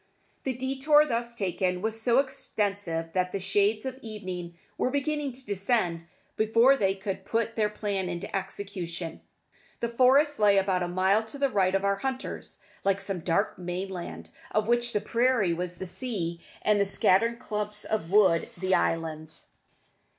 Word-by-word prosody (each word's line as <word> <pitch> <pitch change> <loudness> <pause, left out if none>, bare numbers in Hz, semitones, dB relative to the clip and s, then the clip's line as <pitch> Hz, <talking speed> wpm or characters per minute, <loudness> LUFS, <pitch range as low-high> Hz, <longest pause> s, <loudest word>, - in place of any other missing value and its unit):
The 265 - 0
detour 270 +4 +3
thus 235 -3 -2
taken 180 -3 -1
was 220 +3 -2
so 235 +1 +3
extensive 205 -11 -1
that 180 -1 0
the 195 - -2
shades 205 +3 +1
of 260 0 -4
evening 185 -6 -6 0.2
were - - 0
beginning 285 +1 -1
to 255 +1 -14
descend 195 -5 0 0.3
before 230 +5 +5
they 195 -6 +1
could 195 0 -4
put 230 0 -1
their 215 -2 +2
plan 200 -3 -2
into 175 +1 -5
execution. 185 -4 -4 0.6
The 235 - -1
forest 265 +4 +4
lay 205 -1 +5
about 190 -2 +2
a 175 - 0
mile 190 +4 +2
to 220 +6 -6
the 275 0 +2
right 195 -5 +2
of 195 0 +1
our 200 0 +2
hunters, 265 +4 -4 0.3
like 195 0 +2
some 195 -2 -2
dark 180 +6 0
mainland, 175 - -5 0.2
of 215 0 0
which 240 0 +2
the 210 - 0
prairie 230 -4 +2
was 175 +1 -3
the 190 - -5
sea 175 -5 -3 0.2
and 210 -1 +3
the - - +3
scattered 200 +4 +3
clumps 210 -2 -3
of 210 -7 -2
wood 190 -4 +4
the 190 0 0
islands. 160 -2 -1
200 Hz, 165 wpm, -28 LUFS, 180-235 Hz, 0.6 s, before